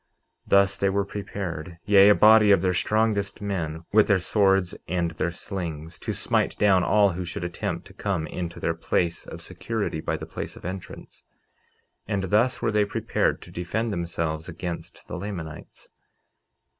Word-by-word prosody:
49:20 - - -49 0.4
Thus 100 0 +4
they 100 - +2
were 100 0 0
prepared, 95 -5 -5
yea, 100 -1 +7
a 105 - +7
body 110 0 +7
of 100 - +5
their 90 -1 +2
strongest 105 +1 0
men, 85 -6 -3
with 110 0 +6
their 100 - +4
swords 95 -1 +2
and 85 -2 0
their 85 +1 -1
slings, 85 -3 -6
to - - -3
smite - - 0
down 95 -3 +4
all 105 0 +4
who 90 +2 -4
should 85 0 -5
attempt 85 0 -3
to 100 - -14
come 95 -5 -2
into 85 +1 -5
their - - 0
place 85 -1 -1
of - - -8
security 110 -8 -3
by - - -2
the - - -7
place - - -6
of - - -12
entrance; 95 +1 -8 0.8
and 100 -2 -1
thus 120 +4 +2
were 115 - +2
they 105 -1 +3
prepared 105 0 -1
to - - -13
defend 105 +6 -2
themselves 85 -2 -3
against 85 0 -7
the 90 - -5
Lamanites. 85 -6 -8
95 Hz, 170 wpm, -25 LUFS, 85-105 Hz, 0.8 s, yea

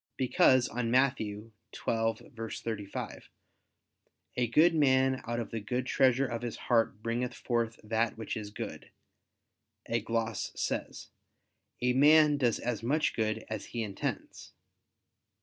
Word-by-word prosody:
Because 130 0 +4
on 120 -1 -2
Matt. 130 +2 +3
12:35, 110 0 -4 1.1
"A 125 -1 +1
good 155 +9 +5
man 130 -3 +3
out 120 0 -1
of 115 - -5
the 115 - -2
good 125 +4 -2
treasure 130 +1 +3
of 115 -2 -4
his 120 -2 -4
heart 115 -3 +1
bringeth 120 +2 -2
forth 115 -2 -1
that 110 +1 0
which 110 - -4
is 105 -2 -5
good," - - -7 1.0
a 115 - 0
gloss 115 0 -2
says: - - -3 0.7
"A 125 0 +3
man 150 +2 +6
does 120 -4 +2
as 120 -3 -3
much 145 +7 +1
good 110 0 -1
as 110 -2 -5
he 115 -1 -4
intends." 100 -2 -5
115 Hz, 130 wpm, -30 LUFS, 110-130 Hz, 1.1 s, man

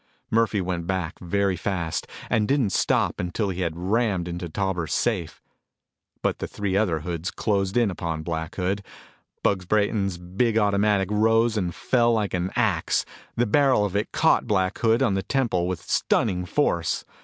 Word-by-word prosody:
Murphy 110 -2 +2
went 90 -2 -3
back 95 -2 -2
very 95 +1 0
fast 85 -3 -2 0.2
and 105 -1 +1
didn't 135 -7 +2
stop - - +1
until 90 +4 -1
he 95 0 -3
had 85 -2 -2
rammed 95 -1 0
into 85 0 -4
the - - -14
Tauber 95 -3 -1
safe. 95 -7 -1 0.8
But - - 0
the - - -3
three 100 -2 -3
other 90 -7 +1
hoods 85 +2 -3
closed 100 0 0
in 115 -5 +3
upon 80 -3 -4
Black 80 -1 -4
Hood. 95 +2 -1 0.6
Bugs 95 -3 +1
Brayton's 100 -2 +1
big 95 +6 0
automatic 100 -2 +2
rose 115 +2 +3
and 90 -5 -1
fell 120 -2 +2
like 105 -3 0
an 90 0 -1
ax. 105 -9 +1 0.3
The 120 - +2
barrel 130 -2 +3
of 100 -1 -4
it 105 +2 -1
caught 160 -6 +3
Black 95 -4 +1
Hood 115 0 +3
on 100 - +2
the 95 - 0
temple 110 -9 0
with 90 -3 -4
stunning 90 -5 +1
force. 85 - 0
95 Hz, 170 wpm, -25 LUFS, 90-110 Hz, 0.8 s, in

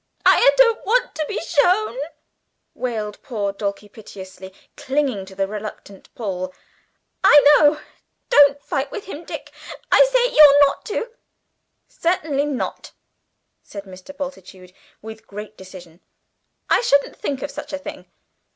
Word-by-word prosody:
"I - - +6
don't 465 -3 +4
want 485 +4 +1
to 310 - -3
be - - -3
shown," 355 - +1 0.8
wailed 215 -4 -5
poor 205 -6 -3
Dulcie 200 0 -5
piteously, 190 -3 -12 0.2
clinging 265 -8 -2
to 190 - -13
the 195 0 -1
reluctant 205 -1 -9
Paul; 185 -7 -5 0.7
"I 295 - +8 0.2
know. 295 0 +4 0.5
Don't 285 0 +5
fight 275 -4 -3
with 410 - -7
him, 340 -3 -9
Dick. - - -8 0.4
I - - +7
say - - +2
you're 290 -1 +8
not 275 - -4
to." 450 +2 -4 0.8
"Certainly 310 -5 -1
not!" 280 -4 -5 0.7
said 200 -1 -10
Mr. 190 +8 -13
Bultitude 190 -10 -9 0.3
with 220 0 -11
great 210 +1 -9
decision. 180 -3 -13 0.7
"I - - +3
shouldn't 280 -11 +1
think 275 -2 -4
of 285 - -5
such - - -8
a 285 - -3
thing!" 280 - -10
265 Hz, 135 wpm, -21 LUFS, 200-295 Hz, 0.8 s, I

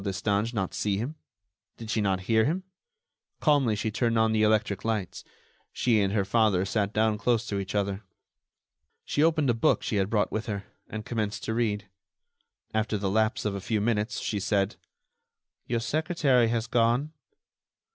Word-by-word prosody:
Destange 100 +2 0
not 95 -6 -2
see 100 -2 0
him? 120 +9 -3 0.6
Did 110 -1 -6
she 115 - +1
not 95 -2 +1
hear 110 +3 +2
him? 175 +6 -1 0.8
Calmly 140 -8 +3
she 110 +1 -2
turned 115 +1 +1
on 110 0 +3
the 110 -1 +2
electric 105 -3 +2
lights; 110 -5 -2 0.5
she 115 -4 +2
and 100 -1 +1
her 100 -3 +1
father 100 -3 +2
sat 100 0 0
down 110 -1 +1
close 115 0 +1
to 100 -3 -2
each 100 +1 -5
other. 100 -1 -1 1.0
She 145 - 0
opened 155 -4 +3
a - - +1
book 115 - +2
she 105 - -1
had 95 0 +1
brought 105 -2 +1
with 110 0 -3
her, 100 -2 -3 0.2
and 110 0 -6
commenced 105 -3 -3
to 110 - -2
read. 105 -3 -1 0.9
After 110 0 0
the 100 -1 -1
lapse 110 +2 +1
of 105 - 0
a 100 - -4
few 110 +2 -1
minutes 105 +1 0
she 105 - -2
said: 100 +1 0 0.9
"Your 120 0 0
secretary 140 -2 +2
has 115 0 0
gone." 120 +6 +1
110 Hz, 175 wpm, -27 LUFS, 100-115 Hz, 1.0 s, Calmly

